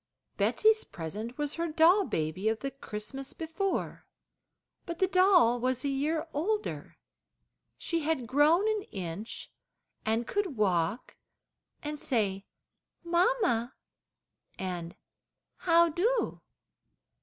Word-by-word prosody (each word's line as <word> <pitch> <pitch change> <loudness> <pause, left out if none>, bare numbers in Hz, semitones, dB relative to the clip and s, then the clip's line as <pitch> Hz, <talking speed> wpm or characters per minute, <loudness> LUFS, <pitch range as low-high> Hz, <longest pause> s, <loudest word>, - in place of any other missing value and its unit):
Betsey's 435 0 +3
present 210 - -6
was 295 -1 -2
her 335 +1 -2
doll 335 +5 +5
baby 160 - -1
of 220 0 -2
the 275 - -3
Christmas 270 +1 -7
before; 330 +4 -3 0.8
but 340 -1 -4
the 380 - +3
doll 365 -10 +5
was 255 +2 -1
a - - +1
year 305 +4 -1
older. 415 +8 -2 0.8
She 335 - -1
had 310 -5 -1
grown 300 - +4
an 435 -1 +1
inch, 190 +3 -6 0.5
and 225 +2 0
could 385 - -2
walk 185 +1 0 0.7
and 300 0 -4
say, 205 -9 -1 0.6
"mamma," 345 - +1 0.8
and 175 -2 -5 0.6
"how 340 -1 +5
do?" 440 +10 0
290 Hz, 110 wpm, -30 LUFS, 220-345 Hz, 0.8 s, doll